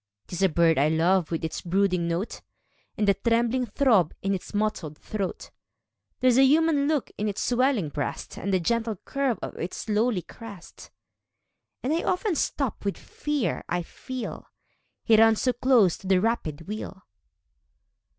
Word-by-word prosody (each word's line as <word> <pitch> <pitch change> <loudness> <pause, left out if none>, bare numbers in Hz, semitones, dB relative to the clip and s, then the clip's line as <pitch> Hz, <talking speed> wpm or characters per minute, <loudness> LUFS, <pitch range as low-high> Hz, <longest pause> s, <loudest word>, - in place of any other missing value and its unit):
'Tis 180 +1 -6
a 190 - +5
bird 165 -2 +3
I 145 - +4
love, 170 +2 +2
with 165 -1 -2
its 160 - -4
brooding 180 -1 +1
note, 170 +6 -3 0.6
And 210 - +1
the 200 - +6
trembling 235 +4 +1
throb 215 - +2
in 195 0 +1
its 185 - -5
mottled 205 -8 -2
throat; 200 -3 -5 0.7
There's 255 0 +4
a - - +7
human 295 +1 +4
look 300 -4 0
in 210 +1 0
its 200 - -4
swellinor 245 - +1
breast, 145 - -4
And 200 - -3
the 185 - +3
gentle 225 +4 0
curve 270 +5 -2
of - - -5
its 175 +6 -5
lowly 215 -3 +1
crest; 205 -7 -12 0.9
And 270 +5 0
I 330 - +1
often 370 +2 0
stop 275 -5 -2
with 200 -1 -1
the - - -16
fear 295 -4 -2
I 175 0 -1
feel 255 +7 -7 0.3
— - - -48
He 225 - +5
runs 225 0 +5
so 250 - +2
close 240 -8 +3
to 195 - -10
the 190 -1 +4
rapid 180 -8 -2
wheel. 195 -2 -6
210 Hz, 170 wpm, -26 LUFS, 180-250 Hz, 0.9 s, a